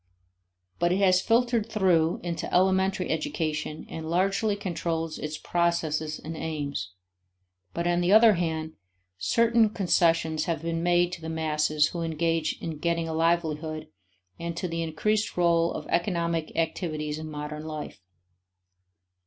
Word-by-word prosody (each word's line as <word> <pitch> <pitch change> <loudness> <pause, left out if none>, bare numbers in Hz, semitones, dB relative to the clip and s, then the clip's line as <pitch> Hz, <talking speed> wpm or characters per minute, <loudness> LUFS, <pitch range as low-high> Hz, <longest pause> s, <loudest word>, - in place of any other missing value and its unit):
But 175 0 +2
is 185 - +2
has 185 -1 +5
filtered 230 -1 +2
through 175 -5 +2
into 170 -1 -4
elementary 190 +1 +2
education 155 -1 -2
and 160 0 -6
largely 195 +4 +1
controls 165 -4 -3
its 150 0 -4
processes 160 -3 0
and 160 +1 -7
aims. 145 - -4 0.8
But, 170 - -1
on 175 0 +2
the 175 +2 +2
other 220 +1 +8
hand, 160 -3 -2 0.5
certain 230 -1 +3
concessions 165 -5 +2
have 165 -2 -2
been 165 0 -1
made 175 0 +3
to 180 - -6
the 160 - -5
masses 155 -1 +1
who 175 - -5
must 165 -1 -2
engage 165 0 0
in 160 -3 -5
getting 170 0 0
a 160 - -3
livelihood 160 -1 0 0.5
and 170 0 -4
to 180 - -2
the 165 0 -3
increased 210 +8 -1
role 170 -1 +3
of - - -5
economic 170 -3 0
activities 155 -2 -2
in 155 0 -6
modern 150 +1 -6
life. 155 -9 -6
165 Hz, 145 wpm, -27 LUFS, 155-180 Hz, 0.8 s, other